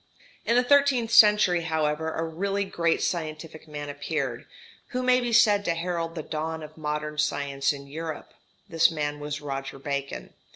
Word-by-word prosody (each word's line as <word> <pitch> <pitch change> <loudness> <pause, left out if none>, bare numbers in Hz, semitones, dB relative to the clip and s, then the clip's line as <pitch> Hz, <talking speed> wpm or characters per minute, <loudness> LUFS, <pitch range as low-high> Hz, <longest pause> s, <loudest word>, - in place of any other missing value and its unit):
In 235 - +2
the 245 - +4
thirteenth 270 -3 +3
century, 210 -6 +6
however, 160 -1 -1
a 165 - -1
really 195 +5 -2
great 170 -3 0
scientific 160 -1 -4
man 145 -1 -6
appeared, 145 -4 -3 0.4
who 255 0 -3
may 255 0 +4
be 240 -1 -2
said 210 -3 +5
to 170 - +1
herald 165 -1 -3
the 160 - -4
dawn 160 +1 -4
of 155 +1 -11
modern 150 0 -4
science 140 -2 0
in 140 -1 -8
Europe. 155 +2 -7 0.3
This 165 0 +4
man 150 -2 -3
was 145 0 -5
Roger 135 -1 -5
Bacon. 140 0 -5
160 Hz, 165 wpm, -26 LUFS, 150-180 Hz, 0.4 s, century